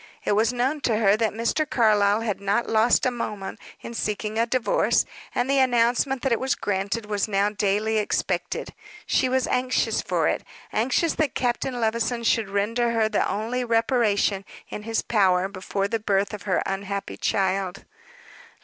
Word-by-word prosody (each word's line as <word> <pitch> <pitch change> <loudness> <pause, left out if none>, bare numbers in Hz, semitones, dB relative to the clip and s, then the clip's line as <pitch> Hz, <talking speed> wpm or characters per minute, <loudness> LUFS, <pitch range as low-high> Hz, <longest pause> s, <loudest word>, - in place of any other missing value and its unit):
It - - +1
was 215 +3 +3
known 260 +5 -1
to 235 -4 +1
her 205 -2 +4
that 220 -1 +1
Mr. 235 +7 -1
Carlyle 210 -2 +3
had 210 -3 -3
not 200 +4 0
lost 225 +3 +3
a 255 - +2
moment 210 -5 -5 0.2
in 235 - -8
seeking 215 0 -2
a 230 - +2
divorce 240 -4 +2 0.3
and 245 - +1
the 275 0 +2
announcement 250 +1 +2
that 270 - +1
it 235 - +2
was 265 0 0
granted 200 +3 -2
was 205 -1 -1
now 200 0 +1
daily 210 +2 0
expected. 210 - -2 0.3
She 255 - +1
was 260 0 +1
anxious 250 0 0
for - - 0
it - - 0 0.3
anxious 260 +9 +1
that 310 -5 0
Captain 245 0 -1
Levison 235 +1 0
should 225 -3 +1
render 230 +4 0
her 220 -1 +2
the - - 0
only 235 +4 -2
reparation 225 -4 +1 0.3
in - - -6
his 225 +1 -2
power 190 -4 +2
before 195 0 -3
the 225 +2 -1
birth 200 -1 0
of 210 - -6
her 185 - +2
unhappy 200 0 -4
child. 195 -1 -1
220 Hz, 170 wpm, -24 LUFS, 200-240 Hz, 0.3 s, her